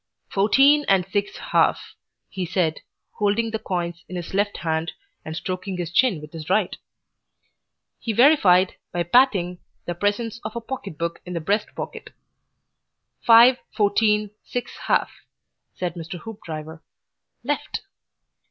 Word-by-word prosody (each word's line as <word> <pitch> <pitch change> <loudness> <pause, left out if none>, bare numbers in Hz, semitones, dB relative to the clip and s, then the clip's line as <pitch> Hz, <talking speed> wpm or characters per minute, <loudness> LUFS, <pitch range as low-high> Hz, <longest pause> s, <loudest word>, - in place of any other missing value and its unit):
"Fourteen 270 +9 +5
and 190 -2 +4
six 205 +1 -2
half," - - +1 0.3
he 190 - -5
said, 175 -3 0 0.4
holding 215 +2 +1
the 220 - -2
coins 170 -3 -3
in 185 - -6
his 175 0 -6
left 205 +1 0
hand 160 0 -2 0.3
and 160 - -6
stroking 185 +2 -4
his 175 -2 -4
chin 195 -2 +3
with 150 +1 -12
his 160 -1 -8
right. 190 0 +2 1.2
He 230 - -2
verified, 205 - +5
by 175 -1 -1
patting, 180 -4 +3 0.3
the 175 - -2
presence 205 +5 -1
of 215 +1 -6
a - - -1
pocketbook 170 - -5
in 180 - -7
the 170 - -1
breast 205 +6 0
pocket. - - -7 1.1
"Five, 235 +2 +7 0.2
fourteen, 210 0 +2
six 245 -1 -5
half," - - +2 0.6
said 180 -2 -3
Mr. 170 +1 -7
Hoopdriver. 160 -7 -8 0.6
"Left." - - -3
195 Hz, 135 wpm, -23 LUFS, 170-220 Hz, 1.2 s, Five